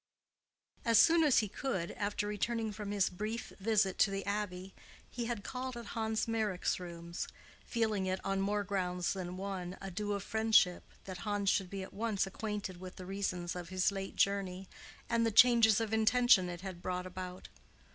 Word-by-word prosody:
As 230 Hz, -1 st, +4 dB
soon 330 Hz, +8 st, +7 dB
as 295 Hz, -5 st, +4 dB
he -, -, -5 dB
could, 195 Hz, -, -3 dB
after 205 Hz, 0 st, -2 dB
returning 220 Hz, +2 st, -1 dB
from 210 Hz, -1 st, -6 dB
his 200 Hz, -2 st, +2 dB
brief 215 Hz, +5 st, -4 dB
visit 205 Hz, -2 st, +2 dB
to -, -, +5 dB
the 195 Hz, 0 st, -3 dB
Abbey, 195 Hz, -2 st, -3 dB, 0.4 s
he 240 Hz, -1 st, -3 dB
had 230 Hz, -3 st, -3 dB
called 255 Hz, -1 st, -4 dB
at 235 Hz, -2 st, -8 dB
Hans 220 Hz, -1 st, -1 dB
Meyrick's 215 Hz, -7 st, 0 dB
rooms, 170 Hz, -1 st, -6 dB, 0.4 s
feeling 215 Hz, -5 st, 0 dB
it, 185 Hz, 0 st, -1 dB
on 195 Hz, 0 st, 0 dB
more 205 Hz, +1 st, 0 dB
grounds 180 Hz, -3 st, -1 dB
than 185 Hz, -2 st, -5 dB
one, 190 Hz, -2 st, -4 dB
a 195 Hz, -1 st, -6 dB
due 205 Hz, +3 st, -2 dB
of 200 Hz, -2 st, -3 dB
friendship 220 Hz, -5 st, +3 dB, 0.2 s
that 185 Hz, -2 st, -7 dB
Hans 205 Hz, -1 st, +1 dB
should 190 Hz, -2 st, 0 dB
be 195 Hz, 0 st, -5 dB
at -, -, -10 dB
once 215 Hz, -2 st, 0 dB
acquainted 205 Hz, -1 st, -4 dB
with 185 Hz, +1 st, -9 dB
the 185 Hz, -, -8 dB
reasons 185 Hz, -2 st, -3 dB
of 175 Hz, -1 st, -6 dB
his 185 Hz, +1 st, +2 dB
late 195 Hz, -1 st, -5 dB
journey, 195 Hz, -1 st, 0 dB, 0.4 s
and 230 Hz, -1 st, +2 dB
the 230 Hz, -, +3 dB
changes 230 Hz, -1 st, +6 dB
of 220 Hz, -1 st, -2 dB
intention 220 Hz, -4 st, +5 dB
it 175 Hz, 0 st, -6 dB
had 185 Hz, -2 st, -7 dB
brought 180 Hz, 0 st, -3 dB
about. 185 Hz, 0 st, -7 dB
200 Hz, 185 wpm, -33 LUFS, 185-220 Hz, 0.4 s, soon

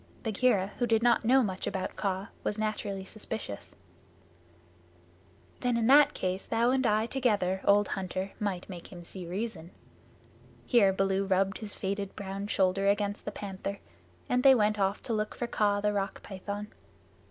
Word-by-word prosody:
Bagheera, 215 Hz, -3 st, +2 dB
who 245 Hz, -, +2 dB
did 225 Hz, 0 st, +2 dB
not 240 Hz, -1 st, +4 dB
know 260 Hz, +3 st, +5 dB
much 190 Hz, -3 st, -3 dB
about 190 Hz, -, -3 dB
Kaa, 195 Hz, 0 st, -2 dB
was 210 Hz, -, -1 dB
naturally 210 Hz, -3 st, -2 dB
suspicious. 215 Hz, -, -6 dB, 1.8 s
"Then 245 Hz, -1 st, +1 dB
in 230 Hz, -, +1 dB
that 285 Hz, +4 st, +6 dB
case, 185 Hz, +1 st, -2 dB
thou 235 Hz, +2 st, +2 dB
and 260 Hz, -1 st, +2 dB
I 215 Hz, +1 st, +2 dB
together, 205 Hz, -8 st, 0 dB
old 205 Hz, 0 st, +4 dB
hunter, 190 Hz, 0 st, -3 dB
might 195 Hz, -4 st, -2 dB
make 175 Hz, -3 st, -9 dB
him 175 Hz, -2 st, -9 dB
see 180 Hz, 0 st, -8 dB
reason." 185 Hz, -2 st, -4 dB, 1.0 s
Here 215 Hz, -6 st, +5 dB
Baloo 195 Hz, 0 st, +1 dB
rubbed 195 Hz, +1 st, +1 dB
his 210 Hz, -2 st, -6 dB
faded 200 Hz, 0 st, -3 dB
brown 200 Hz, 0 st, -5 dB
shoulder 195 Hz, 0 st, +2 dB
against 205 Hz, 0 st, 0 dB
the 210 Hz, -, -3 dB
Panther, 200 Hz, 0 st, -5 dB, 0.5 s
and 250 Hz, 0 st, +2 dB
they 265 Hz, 0 st, +8 dB
went 210 Hz, -2 st, +2 dB
off 195 Hz, +1 st, 0 dB
to 235 Hz, -, -2 dB
look 215 Hz, -1 st, -2 dB
for 240 Hz, -, -2 dB
Kaa 205 Hz, -3 st, +1 dB
the 210 Hz, 0 st, +1 dB
Rock 195 Hz, -1 st, -3 dB
Python. 205 Hz, +2 st, -6 dB
205 Hz, 165 wpm, -30 LUFS, 190-220 Hz, 1.8 s, they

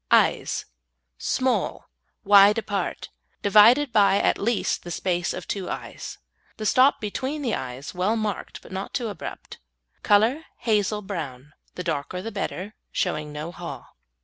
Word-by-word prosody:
EYES -, -, +3 dB, 0.5 s
Small, 260 Hz, -1 st, 0 dB, 0.4 s
wide 205 Hz, 0 st, +7 dB
apart, 205 Hz, -3 st, -3 dB, 0.3 s
divided 230 Hz, +7 st, +6 dB
by 200 Hz, -2 st, +5 dB
at -, -, +2 dB
least 225 Hz, +1 st, 0 dB
the 175 Hz, -, -9 dB
space 175 Hz, +1 st, -1 dB
of -, -, -6 dB
two 195 Hz, -3 st, -3 dB
eyes. -, -, -6 dB, 0.4 s
The 215 Hz, -, -5 dB
stop 260 Hz, +6 st, +5 dB
between 265 Hz, +8 st, -3 dB
the 240 Hz, -, 0 dB
eyes 130 Hz, +2 st, -5 dB
well 190 Hz, +5 st, +1 dB
marked, 215 Hz, -3 st, -4 dB
but -, -, -14 dB
not 190 Hz, +1 st, -5 dB
too 240 Hz, -4 st, -1 dB
abrupt. 205 Hz, -, -8 dB, 0.4 s
Colour 225 Hz, +9 st, +3 dB
hazel 210 Hz, -2 st, 0 dB
brown, 150 Hz, -8 st, -6 dB, 0.2 s
the 180 Hz, -, -4 dB
darker 165 Hz, +1 st, -2 dB
the 225 Hz, +5 st, -5 dB
better, 200 Hz, 0 st, -4 dB, 0.2 s
showing 150 Hz, -5 st, -1 dB
no 150 Hz, +3 st, -5 dB
haw. -, -, -8 dB
205 Hz, 145 wpm, -25 LUFS, 180-225 Hz, 0.5 s, wide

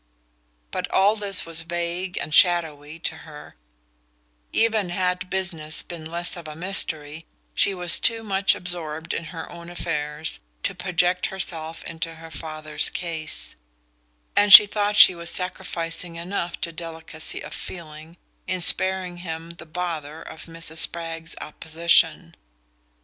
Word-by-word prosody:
But -, -, -3 dB
all 200 Hz, +3 st, +4 dB
this 200 Hz, -3 st, +2 dB
was 165 Hz, -1 st, -2 dB
vague 175 Hz, +2 st, -3 dB
and 155 Hz, -, -4 dB
shadowy 160 Hz, -4 st, +3 dB
to 160 Hz, -1 st, -4 dB
her 150 Hz, -2 st, -12 dB, 1.0 s
Even 220 Hz, -4 st, +2 dB
had 180 Hz, 0 st, -1 dB
"business" 170 Hz, -5 st, -1 dB
been 170 Hz, -2 st, -9 dB
less 170 Hz, +2 st, -1 dB
of 170 Hz, -3 st, -9 dB
a 155 Hz, -, -8 dB
mystery, 160 Hz, -3 st, -1 dB, 0.3 s
she 195 Hz, -, +1 dB
was 180 Hz, -1 st, +2 dB
too 225 Hz, -1 st, +1 dB
much 195 Hz, -2 st, +2 dB
absorbed 165 Hz, -2 st, -4 dB
in 165 Hz, -, -3 dB
her 160 Hz, +1 st, -7 dB
own 170 Hz, 0 st, -10 dB
affairs 155 Hz, -3 st, -2 dB, 0.2 s
to -, -, 0 dB
project 180 Hz, 0 st, 0 dB
herself 165 Hz, -4 st, -4 dB
into 165 Hz, 0 st, -5 dB
her 165 Hz, 0 st, -12 dB
father's 155 Hz, -1 st, -2 dB
case; 160 Hz, -, -3 dB, 0.8 s
and 205 Hz, 0 st, +4 dB
she 210 Hz, -, +13 dB
thought 205 Hz, 0 st, -1 dB
she 185 Hz, -, +10 dB
was 170 Hz, -1 st, -3 dB
sacrificing 170 Hz, -2 st, -1 dB
enough 170 Hz, 0 st, -4 dB
to 170 Hz, -, -2 dB
delicacy 160 Hz, -1 st, -6 dB
of -, -, -8 dB
feeling 160 Hz, -1 st, -8 dB, 0.3 s
in 185 Hz, 0 st, -1 dB
sparing 185 Hz, 0 st, +3 dB
him 165 Hz, -1 st, -6 dB
the 170 Hz, -1 st, -12 dB
"bother" 160 Hz, -2 st, -5 dB
of 160 Hz, -, -10 dB
Mrs. 165 Hz, -1 st, 0 dB
Spragg's 165 Hz, 0 st, -1 dB
opposition. 160 Hz, -, +1 dB
170 Hz, 140 wpm, -24 LUFS, 160-180 Hz, 1.0 s, she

